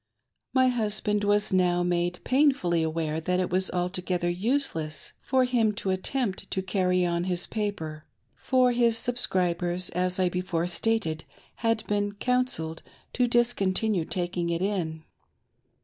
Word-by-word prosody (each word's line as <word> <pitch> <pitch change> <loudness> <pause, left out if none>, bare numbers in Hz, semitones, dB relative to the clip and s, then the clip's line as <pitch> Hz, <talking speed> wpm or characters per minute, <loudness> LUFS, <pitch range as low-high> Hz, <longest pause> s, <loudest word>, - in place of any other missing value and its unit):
My 260 -1 +4
husband 210 -3 0
was 205 -1 +2
now 175 -1 +3
made 175 0 -1
painfully 255 - +2
aware 160 -1 -1
that 180 +3 0
it 185 - -1
was 185 +1 +1
alto 180 +1 -2
gether 175 -1 -1
useless 175 - -1
for 260 -1 +2
him 235 -4 +2
to 200 -2 -2
attempt 195 +2 -2
to 190 - -2
carry 185 -2 +1
on 170 0 0
his 180 -1 +1
paper, 160 -8 -4 0.3
for 255 -1 +2
his 235 -2 +3
subscribers, 180 -7 0
as 180 +1 0
I 185 - +3
before 180 -2 -1
stated, 175 -3 -1 0.3
had 225 -1 0
been 205 0 -1
"counselled" 205 -9 -1 0.3
to 250 -1 +2
dis 240 0 +3
continue 195 -2 +1
taking 175 -1 -2
it 170 +1 -1
in. 165 -6 -2
185 Hz, 145 wpm, -27 LUFS, 175-225 Hz, 0.3 s, My